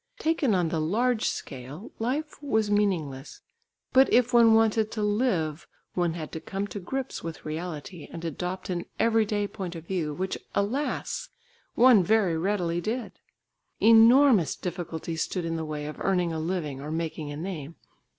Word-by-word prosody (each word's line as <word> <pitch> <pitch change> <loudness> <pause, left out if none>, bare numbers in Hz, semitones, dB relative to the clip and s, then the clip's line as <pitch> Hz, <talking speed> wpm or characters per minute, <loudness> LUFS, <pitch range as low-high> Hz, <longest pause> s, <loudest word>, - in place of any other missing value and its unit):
Taken 310 - +1
on 175 -3 +1
the 160 -1 -1
large 225 +8 +1
scale, 135 - -5
life 285 +8 -2
was 220 -7 0
meaningless, 165 -10 -1 0.5
but 265 +1 +6
if 250 +1 +4
one 230 -2 +7
wanted 220 -1 +3
to 215 - -2
live, 200 - 0 0.3
one 175 -2 0
had 160 -3 -6
to 160 - -5
come 195 +4 -4
to 205 - -5
grips 265 +8 -4
with 165 -4 -7
reality, 160 +1 -6
and 170 0 -7
adopt 180 +4 -4
an 175 -1 -3
everyday 215 -2 +2
point 185 -3 -6
of 165 -1 -8
view, 170 -5 -2
which 190 +3 -3 0.2
alas! 275 - -1 0.5
one 240 -5 +7
very 200 -3 +3
readily 175 -1 0
did. 230 +5 -3 0.7
Enormous 230 - +6
difficulties 170 -2 -4
stood 180 -3 -2
in 165 0 -2
the 160 -1 -3
way 150 -1 -4
of 150 - -6
earning 180 -3 +1
a 160 - -2
living 155 -5 -3
or 145 - -6
making 160 -2 -3
a 145 - -6
name. 165 -3 -6
185 Hz, 160 wpm, -27 LUFS, 160-225 Hz, 0.7 s, one